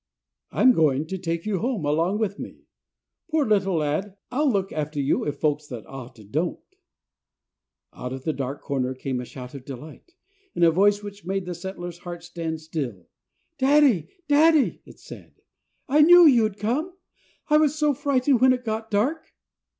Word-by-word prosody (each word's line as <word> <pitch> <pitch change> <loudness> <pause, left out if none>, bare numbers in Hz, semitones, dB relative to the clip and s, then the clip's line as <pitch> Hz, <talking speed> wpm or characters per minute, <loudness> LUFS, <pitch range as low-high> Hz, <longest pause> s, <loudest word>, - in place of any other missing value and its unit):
"I'm 260 - +5
going 150 - +2
to 190 +4 -5
take 165 -1 -3
you 205 -4 -1
home 230 - -2
along 165 +7 +1
with 210 -3 -2
me. - - -9 0.6
Poor 310 -3 +1
little 195 -4 +2
lad, 160 +6 -2
I'll 285 +3 +2
look 195 -3 -1
after 150 -1 -3
you 140 0 +1
if 145 - -3
folks 150 -1 0
that 120 -7 -8
ought 130 0 -10
to 110 - -14
don't." 155 - -2 1.4
Out 125 - -6
of 130 0 -6
the 155 - -1
dark 135 0 -5
corner 130 -3 -2
came 130 -1 -3
a - - -7
shout 125 +1 -10
of 140 -3 -9
delight, 150 - -11 0.4
in 175 - +1
a 165 - +6
voice 205 +4 +3
which 205 0 -9
made 190 +1 -2
the 180 - -4
settler's 175 -1 -7
heart 175 -1 -8
stand 165 -2 -5
still. 135 - -5 0.5
"Daddy, 265 - +4 0.2
daddy," 300 0 +4
it - - -15
said, - - -13 0.5
"I 295 +2 +4
knew 350 +3 +8
you'd 225 -8 +4
come. 265 - -2 0.6
I 300 - +5
was 305 -1 +3
so 300 -1 +2
frightened 275 -2 +1
when 260 0 +6
it 250 -1 -5
got 220 0 -3
dark!" 255 +11 -1
185 Hz, 175 wpm, -24 LUFS, -, 1.4 s, knew